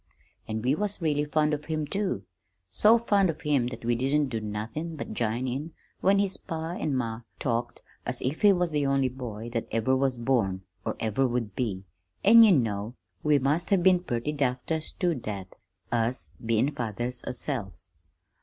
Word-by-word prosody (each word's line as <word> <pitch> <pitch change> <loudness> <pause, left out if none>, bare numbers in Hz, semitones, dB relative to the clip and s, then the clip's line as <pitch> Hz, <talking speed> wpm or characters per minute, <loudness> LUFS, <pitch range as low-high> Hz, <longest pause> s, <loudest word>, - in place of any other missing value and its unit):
An' 110 0 -3
we 130 +2 +3
was 205 +5 -1
really 150 -3 +1
fond 150 0 +1
of 150 0 -3
him, 155 -1 -2
too, 190 - -2 0.5
so 215 - +6
fond 205 -5 +2
of 160 - -4
him 140 -5 +2
that 120 -2 -7
we 120 - +2
didn't 135 +4 +1
do 115 -3 -3
nothin' 110 +11 -4
but 150 - -6
jine 120 +2 -1
in 145 +6 -4 0.3
when 195 +1 +4
his 195 -1 +1
pa 165 -2 -5
an' 155 -5 -2
ma 115 -2 -2 0.2
talked 120 -2 -2 0.2
as - - -2
if 135 +5 -2
he 205 -2 +7
was 180 -3 +1
the 150 -1 +1
only 135 -1 +2
boy 120 -3 -7
that 115 - -2
ever 115 +4 +1
was 130 -1 +1
born, 115 -7 0 0.2
or - - -1
ever 115 +5 +1
would 120 -5 -2
be 100 -7 -2 0.4
an' 230 +3 +9
you 220 -3 +8
know 115 - +1 0.3
we 150 -1 +4
must 145 +6 +1
have 195 -4 +3
been 185 -1 +6
purty 120 -5 -2
daft 130 -4 -1
ter 160 -1 0
stood 160 -2 -1
that, 100 -4 -6 0.4
us 120 +1 -1
bein' 115 +5 +2
fathers 120 0 -3
ourselves! 100 - -4
130 Hz, 185 wpm, -28 LUFS, 115-155 Hz, 0.5 s, an